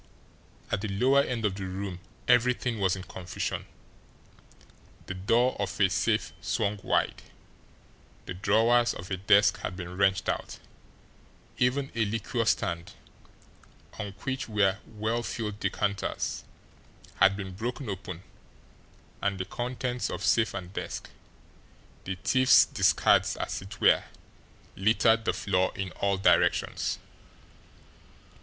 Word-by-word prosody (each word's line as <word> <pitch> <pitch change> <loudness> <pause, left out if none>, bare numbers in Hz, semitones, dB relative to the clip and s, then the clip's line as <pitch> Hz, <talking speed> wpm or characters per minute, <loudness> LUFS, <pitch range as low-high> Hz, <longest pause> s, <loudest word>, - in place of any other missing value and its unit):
At 100 - 0
the 110 - -2
lower 125 +8 +3
end 120 -5 -2
of 100 - +1
the 95 0 -5
room 95 -1 -5 0.3
everything 125 -1 +2
was 95 -2 +2
in 95 - -7
confusion; 90 -1 -5 1.4
the - - -5
door 115 +7 +2
of 100 -3 -3
a 95 -2 +4
safe 70 -5 0
swung 105 0 -1
wide, - - 0 1.0
the - - -5
drawers 115 +6 +3
of 90 +3 -9
a 95 - 0
desk 100 +2 +4
had 90 - -4
been 90 -1 -6
wrenched 95 -1 +2
out, - - -2 1.0
even 135 +2 +1
a 115 - +1
liqueur 115 +2 -2
stand, 90 -5 -1 1.1
on 100 -2 -4
which 135 -2 -3
were 100 -2 +2
well 110 +2 -2
filled 105 -3 -4
decanters, 100 -2 -2 0.7
had 100 0 +5
been 95 -2 -6
broken 120 +6 -4
open, 95 -2 -6 1.0
and 100 -1 0
the 95 - -2
contents 125 +3 -3
of 100 - -4
safe 110 +3 +2
and 95 -1 -6
desk, - - -5 0.9
the 95 - -3
thief's 130 -1 +6
discards - - +3
as - - -3
it 95 +1 -10
were, - - +4 0.7
littered 110 +2 +3
the - - +2
floor 95 -2 +1
in 95 -1 -4
all 100 -1 0
directions. 95 - +2
100 Hz, 125 wpm, -28 LUFS, 95-115 Hz, 1.4 s, thief's